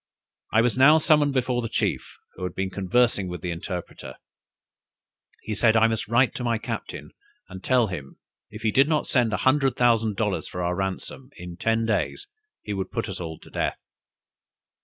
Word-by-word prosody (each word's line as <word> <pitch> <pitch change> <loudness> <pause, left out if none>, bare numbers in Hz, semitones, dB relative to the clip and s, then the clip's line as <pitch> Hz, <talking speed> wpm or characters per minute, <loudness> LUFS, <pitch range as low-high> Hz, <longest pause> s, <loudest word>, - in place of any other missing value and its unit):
I 110 - +4
was 120 +2 0
now 150 +4 +8
summoned 150 -3 +3
before 125 -1 +1
the 115 - -4
chief, - - -2 0.2
who - - -14
had 90 0 -4
been 95 0 -2
conversing 100 +1 +1
with 90 -2 -6
the 90 - -3
interpreter: 85 -6 -6 1.3
he 110 - -4
said 110 +2 +3
I 110 - +5
must 110 -2 -2
write 120 +3 +3
to 125 - -5
my 120 -1 +1
captain, 110 - -6 0.4
and 95 0 -10
tell 125 -2 +3
him, 75 -9 -7 0.3
if 105 +1 -10
he 110 - +2
did 135 +5 +4
not 155 -2 +1
send 120 -4 +1
an 105 - 0
hundred 135 +3 +2
thousand 115 -3 +2
dollars 105 -3 -1
for 90 - -5
our 90 +1 0
ransom, 95 +7 -4
in 90 0 -8
ten 115 +5 0
days 110 - -1 0.4
he 105 - -4
would 95 -1 -3
put - - -3
us - - -6
all 80 -2 -6
to - - -16
death." - - -1
110 Hz, 190 wpm, -25 LUFS, 95-125 Hz, 1.3 s, now